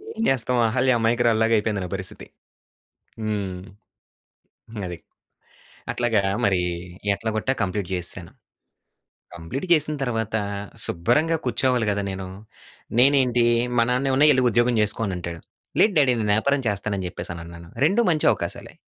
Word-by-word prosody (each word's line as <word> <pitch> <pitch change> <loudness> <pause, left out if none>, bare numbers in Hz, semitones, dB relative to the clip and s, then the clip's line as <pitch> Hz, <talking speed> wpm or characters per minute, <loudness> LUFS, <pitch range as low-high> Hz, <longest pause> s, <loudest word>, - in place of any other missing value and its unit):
ఏం - - -4
చేస్తాం. 125 -1 +1
అహల్య 130 +2 +2
అమాయకురాలు 115 0 +2
లాగా 115 0 +2
అయిపోయింది 105 -2 -1
నా 90 - -5
పరిస్థితి. 95 -1 -7 1.0
హ్మ్. 100 -4 -3 1.3
అది. 90 -2 -6 0.9
అట్లాగా 115 -4 +1 0.2
మరీ 95 -3 +2 0.5
ఎట్లా 110 +3 -3
కొట్టా 120 +5 0
కంప్లీట్ 95 0 -2
చేసేసాను. 90 -1 -4 1.0
కంప్లీట్ 85 - -5
చేసిన 155 -1 +1
తర్వాత 115 -4 -2 0.5
శుబ్బరంగా 150 - +1
కూర్చోవాలి 125 0 +1
గదా! 100 0 0
నేను. 95 0 -5 0.7
నేనేంటి 125 -2 +4 0.3
మా 115 - +5
నాన్నేమన్న 135 +3 +2
"ఎళ్లి 130 -2 +3
ఉద్యోగం 120 +2 +2
చేసుకోనంటాడు." 95 -5 0 0.4
"లేదు 210 - +5
డ్యాడీ 135 -4 +4
నేను 105 -1 -1
వ్యాపారం 140 +6 +1
చేస్తాను" 105 0 -1
అని 95 - -4
చెప్పేసి 90 - -6
అని 85 - -8
అన్నాను. 85 0 -11 0.2
2 200 +9 +3
మంచి 155 -2 +1
అవకాశాలే. - - -5
115 Hz, 130 wpm, -23 LUFS, 95-130 Hz, 1.3 s, మా